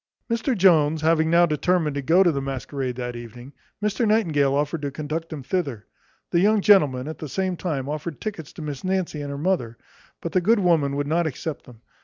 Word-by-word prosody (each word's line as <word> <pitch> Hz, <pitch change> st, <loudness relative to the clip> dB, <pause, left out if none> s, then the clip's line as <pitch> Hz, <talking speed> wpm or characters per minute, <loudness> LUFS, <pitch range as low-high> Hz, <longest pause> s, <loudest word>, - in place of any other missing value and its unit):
Mr 230 Hz, +1 st, 0 dB
Jones 160 Hz, -5 st, +4 dB
having 160 Hz, 0 st, +3 dB
now 170 Hz, +1 st, +5 dB
determined 160 Hz, 0 st, +1 dB
to 140 Hz, -, -2 dB
go 170 Hz, +7 st, +4 dB
to 175 Hz, -, +4 dB
the 140 Hz, -3 st, -2 dB
masquerade 135 Hz, -1 st, -4 dB
that 125 Hz, -1 st, -5 dB
evening, 120 Hz, +3 st, -10 dB, 0.3 s
Mr 215 Hz, +3 st, +1 dB
Nightingale 155 Hz, -11 st, +2 dB
offered 145 Hz, +2 st, -1 dB
to 145 Hz, -, -2 dB
conduct 155 Hz, +4 st, -5 dB
him 150 Hz, -4 st, -6 dB
thither. 140 Hz, -, -2 dB, 0.5 s
The 170 Hz, -, +3 dB
young 210 Hz, +3 st, +4 dB
gentleman, 145 Hz, -11 st, +4 dB
at 155 Hz, -, -6 dB
the 155 Hz, -, -6 dB
same 185 Hz, +5 st, -1 dB
time, 150 Hz, -7 st, -3 dB
offered 150 Hz, +1 st, -5 dB
tickets 185 Hz, -9 st, -6 dB
to 160 Hz, -, -8 dB
Miss 145 Hz, -3 st, -6 dB
Nancy 185 Hz, -5 st, -1 dB
and 145 Hz, -, -5 dB
her 140 Hz, -, -5 dB
mother; 140 Hz, -8 st, -1 dB, 0.4 s
but 170 Hz, -, -5 dB
the 185 Hz, -, +2 dB
good 225 Hz, +6 st, +4 dB
woman 165 Hz, -8 st, +2 dB
would 145 Hz, 0 st, -1 dB
not 165 Hz, +3 st, +1 dB
accept 155 Hz, +1 st, -5 dB
them. 120 Hz, -3 st, -15 dB
155 Hz, 210 wpm, -24 LUFS, 140-180 Hz, 0.5 s, now